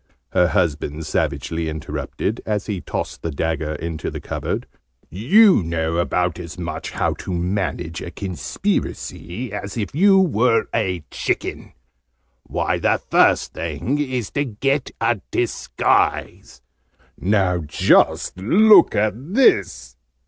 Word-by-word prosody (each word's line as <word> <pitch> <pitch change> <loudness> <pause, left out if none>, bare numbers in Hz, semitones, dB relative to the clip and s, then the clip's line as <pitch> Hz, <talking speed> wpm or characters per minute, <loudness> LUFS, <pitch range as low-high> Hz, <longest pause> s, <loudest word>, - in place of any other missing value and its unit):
her 90 - +3
husband 80 -4 -1
savagely 80 +2 -2
interrupted, 80 +7 -4
as 105 -2 -2
he 100 -5 -3
tossed - - -5
the 85 - -3
dagger 80 0 -2
into 80 +1 -4
the - - -6
cupboard. - - -4 0.5
"You 180 - +5
know 80 -1 -2
about 90 +1 0
as 85 0 -8
much 85 -2 -5
how - - -1
to - - -6
manage 90 -2 -2
a - - -6
Conspiracy 95 +3 -4
as 100 +1 -5
if 105 -5 -3
you 195 +5 +5
were 125 - +3
a 90 -7 -1
chicken. - - -3 0.7
Why, - - -2
the - - +2
first - - +3
thing 140 +4 -2
is 130 -6 -2
to 145 - 0
get 135 +3 -1
a 115 -3 +1
disguise. 120 - -1 0.5
Now, 95 -2 +1
just 80 -2 +2
look 195 - +6
at 105 +1 +2 0.2
this!" 65 - +2
95 Hz, 125 wpm, -21 LUFS, 80-120 Hz, 0.7 s, look